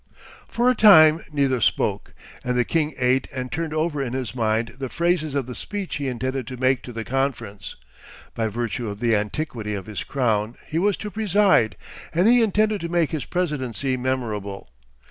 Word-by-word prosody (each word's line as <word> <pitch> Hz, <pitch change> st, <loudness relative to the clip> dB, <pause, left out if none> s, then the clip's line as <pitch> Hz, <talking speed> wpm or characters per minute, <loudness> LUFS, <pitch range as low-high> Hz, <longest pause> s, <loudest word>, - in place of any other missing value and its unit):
For 240 Hz, +1 st, 0 dB
a 255 Hz, -, +6 dB
time 165 Hz, -8 st, +7 dB
neither 135 Hz, -4 st, +1 dB
spoke, -, -, 0 dB, 0.3 s
and 125 Hz, 0 st, -1 dB
the 125 Hz, -, +2 dB
king 155 Hz, -3 st, 0 dB
ate 130 Hz, +1 st, +2 dB
and 130 Hz, -1 st, -5 dB
turned 165 Hz, -1 st, -3 dB
over 155 Hz, -1 st, -1 dB
in 125 Hz, -3 st, -3 dB
his 130 Hz, -4 st, -3 dB
mind 115 Hz, -1 st, 0 dB
the 135 Hz, -2 st, -4 dB
phrases 170 Hz, -3 st, 0 dB
of 140 Hz, -3 st, 0 dB
the 125 Hz, -, -7 dB
speech 200 Hz, -, -5 dB
he 140 Hz, -2 st, -3 dB
intended 130 Hz, 0 st, -3 dB
to 130 Hz, -, -6 dB
make 130 Hz, -1 st, +2 dB
to 125 Hz, -, -9 dB
the 115 Hz, -1 st, -5 dB
conference. 130 Hz, -6 st, -3 dB, 0.6 s
By 115 Hz, -1 st, -1 dB
virtue 115 Hz, +1 st, -3 dB
of 100 Hz, 0 st, -7 dB
the 115 Hz, -1 st, +2 dB
antiquity 105 Hz, 0 st, -3 dB
of 95 Hz, -2 st, -6 dB
his 105 Hz, -1 st, -5 dB
crown 115 Hz, -4 st, -1 dB
he 160 Hz, -, -2 dB
was 200 Hz, +1 st, +2 dB
to 210 Hz, -, -6 dB
preside, 195 Hz, -, +3 dB, 0.4 s
and 180 Hz, +5 st, +4 dB
he 240 Hz, +1 st, +6 dB
intended 215 Hz, -1 st, +2 dB
to 170 Hz, -, -4 dB
make 170 Hz, -3 st, +1 dB
his 155 Hz, -4 st, -3 dB
presidency 140 Hz, -, -2 dB
memorable. 110 Hz, -, -3 dB
130 Hz, 185 wpm, -23 LUFS, 115-165 Hz, 0.6 s, time